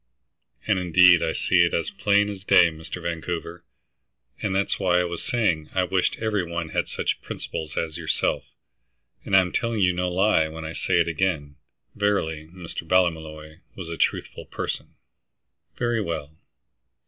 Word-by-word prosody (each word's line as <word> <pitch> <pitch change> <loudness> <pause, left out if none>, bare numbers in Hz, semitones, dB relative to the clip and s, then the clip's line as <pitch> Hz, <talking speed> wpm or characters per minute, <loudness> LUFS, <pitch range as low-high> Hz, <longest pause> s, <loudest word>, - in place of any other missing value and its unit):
"And 105 -4 +2
indeed, 90 0 +6
I 80 - 0
see 90 -2 +3
it 85 - +1
as 85 +5 -1
plain 100 +1 +2
as 100 -2 -7
day, 85 -3 +6
Mr. 80 0 -8
Vancouver. 85 0 -4 0.8
And 95 -2 -1
that's 100 +1 0
why 90 -1 +3
I - - +2
was 85 -1 -4
saying 90 -11 0
I 95 - +3
wished 90 0 +1
every 110 -3 -1
one 85 -1 -4
had - - -1
such - - -2
principles 80 -1 -6
as 80 -2 -2
yourself, 70 -1 -1 0.8
and 95 - +1
I'm 90 -2 +4
telling 115 -2 -1
you 90 -1 +4
no 90 0 -1
lie 95 -3 +3
when 80 0 -8
I 80 - -5
say - - -1
it 85 - +3
again." 80 -4 -1 0.4
Verily 80 -7 -1
Mr. 85 0 -7
Ballymolloy 80 -3 0 0.2
was 90 -4 -7
a 85 - -4
truthful - - -2
person! - - -5 0.8
"Very 120 -2 0
well. 80 -5 -4
85 Hz, 160 wpm, -24 LUFS, 80-95 Hz, 0.8 s, indeed